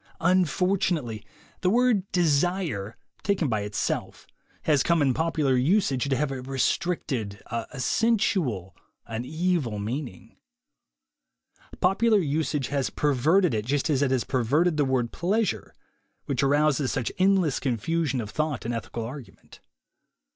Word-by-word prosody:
Unfortunately, 175 - +1 0.4
the 180 - +1
word 230 -3 +2
"desire,'' 160 - 0 0.2
taken 190 -6 0
by 110 -3 0
it 105 0 -6
self, - - -2 0.4
has 150 -4 +3
come 170 +3 +2
in 140 -3 +3
popular 155 -3 +1
usage 140 - +2
to 135 - +2
have 140 +1 -1
a 130 -1 -4
restricted, 130 - -1
a 115 +4 -5
sensual, 140 - 0 0.3
an 115 +2 -5
evil 160 -7 -1
meaning. 115 - -6 1.4
Popular 215 +4 +3
usage 150 -4 -1
has 140 -2 0
perverted 150 +5 +2
it 105 -1 -1
just 145 +6 0
as 140 -2 +1
it 140 - +2
has 130 -2 +1
perverted 145 +7 +1
the 145 -2 +2
word 130 -3 0
"pleasure." 205 +4 -1 0.5
which - - -1
arouses 145 0 +2
such 125 -3 -2
endless 185 -6 +3
confusion 135 +3 -1
THE 120 - -1
WAY 105 - -8
TO - - -12
WILL - - -18
POWER 155 - +3
11 150 - -3
of - - -6
thought 105 - -14
in 120 - -2
ethical 115 0 -4
argument. 130 +1 -11
145 Hz, 150 wpm, -26 LUFS, 125-175 Hz, 1.4 s, has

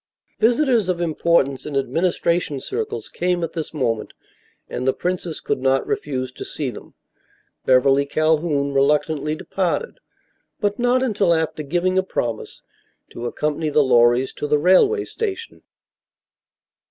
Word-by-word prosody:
Visitors 240 -3 +3
of 180 -1 0
importance 160 -5 +1
in 150 - -5
administration 170 0 0
circles 440 - -4
came 180 -1 -1
at 165 - -3
this 160 -3 -4
moment 120 -7 -2 0.5
and 125 - -4
the 130 - +2
princess 180 -2 -3
could - - -2
not 135 0 +2
refuse 130 -3 -3
to - - -8
see 140 -5 -4
them. - - -12 0.7
Beverly 135 +2 +4
Calhoun 155 -2 +1
reluctantly 150 +2 +1
departed, 195 - -2 0.6
but 205 0 -1
not 245 +1 +2
until 200 -8 +2
after 160 -1 -2
giving 175 +5 0
a - - +4
promise 120 -11 -4 0.5
to 120 +1 -5
accompany 150 +4 -2
the 150 0 +3
Lorrys 120 0 +3
to 150 - -3
the 150 0 +3
railway 190 - +4
station. 450 +1 -5
155 Hz, 135 wpm, -21 LUFS, 140-185 Hz, 0.7 s, Beverly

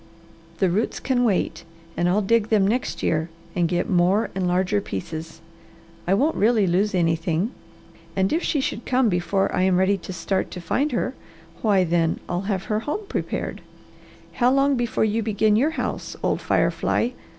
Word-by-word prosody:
"The 190 -3 +2
roots 210 +6 -1
can 250 -1 +1
wait 210 -6 0 0.3
and 175 0 +1
I'll 205 +4 +2
dig 225 +1 +2
them 210 -3 +4
next 245 +5 -1
year 160 +1 0 0.3
and 175 -2 +2
get 175 0 0
more 185 +4 +2
and 185 -1 -1
larger 185 +3 +1
pieces. 160 - -6 0.7
I 190 - +4
won't 290 +9 +2
really 215 -1 +3
lose 190 +3 +1
anything, 165 +4 +1 0.6
and 190 +4 +1
if 330 - +1
she 295 -6 0
should 235 - -4
come 255 -2 +3
before 180 +2 0
I - - +1
am 185 -1 +3
ready 190 +1 +2
to 180 - -8
start 190 +1 -2
to 180 - -7
find 270 - 0
her, 250 +2 -1 0.5
why 200 -4 +3
then 165 -1 +1
I'll 180 +4 -3
have 190 -2 -1
her 215 +1 -1
home 300 - -4
prepared. - - -3 0.7
How 245 0 +3
long 275 +1 +3
before 240 -3 0
you 220 +1 0
begin 215 0 +2
your 265 +8 +3
house, - - -3
old - - 0
fire - - +2
fly?" 245 +2 0
195 Hz, 180 wpm, -23 LUFS, 180-230 Hz, 0.7 s, them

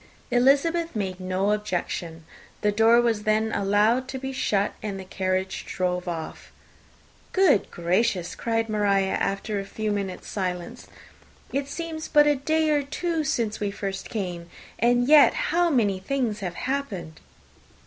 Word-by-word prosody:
Elizabeth 285 +7 +3
made 190 -3 -3
no 185 +2 0
objection: 175 -5 -3 0.4
the 210 - +2
door 225 +3 +5
was 230 -3 +1
then 215 +1 +1
allowed 210 +6 +2
to 265 - -5
be 265 0 -5
shut, 205 -6 0
and 200 -2 -4
the 190 - -8
carriage 185 0 -2
drove 180 0 -2
off. 165 -2 -6 0.8
"Good 370 - +4
gracious!" 180 +1 0
cried 225 -1 -1
Maria, 200 -3 +1
after 200 +1 -1
a - - -3
few 215 +2 -3
minutes' 200 -3 -4
silence, 185 +4 -4 0.7
"it 275 0 -1
seems 320 0 -5
but 295 -1 +5
a 295 - +4
day 315 +3 +1
or 295 -1 +3
two 320 +3 -2
since 230 -6 -1
we 205 - -1
first 195 -1 -5
came! 175 -5 -4 0.3
and 245 +2 +3
yet 300 -1 +7
how 350 -8 +1
many 210 - +2
things 230 0 -2
have 180 -4 -4
happened!" 210 - -4
215 Hz, 150 wpm, -25 LUFS, 190-270 Hz, 0.8 s, yet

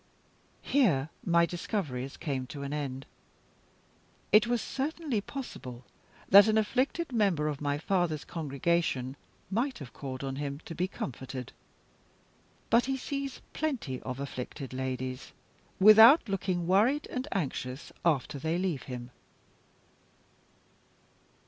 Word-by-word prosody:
Here 165 - +2
my 170 0 +4
discoveries 160 - -3
came 135 -5 -3
to 140 +1 -7
an 140 +1 -4
end. 135 -3 -4 1.3
It 215 +2 +6
was 240 0 +1
certainly 280 -2 -2
possible 130 - -8 0.4
that 200 +2 +9
an 220 0 +3
afflicted 260 +9 0
member 195 -9 +2
of 150 -2 -3
my 145 -1 0
father's 165 -2 0
congregation 150 -3 -1 0.4
might 245 +6 0
have 140 -5 -10
called 130 -1 -6
on 135 0 -3
him 140 0 -4
to - - -6
be 180 +3 -1
comforted. 130 -6 -6 1.2
But 235 +1 +5
he 270 0 -1
sees 275 0 -4
plenty 255 - -2
of 130 0 -5
afflicted 135 -1 -6
ladies, 130 0 -4 0.5
without 220 - +9
looking 185 -3 -1
worried 220 - +3
and 255 +3 -3
anxious 135 -6 -3
after 145 -3 +1
they 160 +4 -1
leave 175 -7 -1
him. 125 -1 -7
165 Hz, 120 wpm, -30 LUFS, 135-220 Hz, 1.3 s, that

